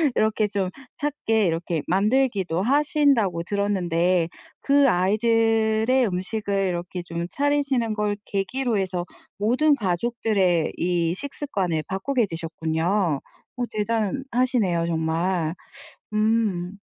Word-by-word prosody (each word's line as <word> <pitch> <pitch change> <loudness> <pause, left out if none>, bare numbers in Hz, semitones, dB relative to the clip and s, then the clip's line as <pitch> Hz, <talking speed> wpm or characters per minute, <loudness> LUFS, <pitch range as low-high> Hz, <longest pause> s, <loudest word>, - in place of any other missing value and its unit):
이렇게 215 0 +2
좀 195 -2 -1 0.3
찾게 225 -7 0
이렇게 165 -1 -1
만들기도 200 -3 +1
하신다고 270 - +2
들었는데 180 -3 +1 0.3
그 280 -1 +4
아이들의 225 +4 +2
음식을 195 +1 -1
이렇게 175 0 -4
좀 170 0 -4
차리시는 280 -5 +1
걸 210 -1 -1
계기로 225 +4 -1
해서 185 -2 -2 0.3
모든 255 +9 +3
가족들의 190 - 0
이 170 -1 0
식습관을 195 - -2
바꾸게 230 +6 0
되셨군요. 165 0 -1 0.3
어 250 - -2
대단하시네요 225 -3 0
정말. 165 +1 0 0.6
음 210 -4 0
200 Hz, 250 characters per minute, -24 LUFS, 175-230 Hz, 0.6 s, 그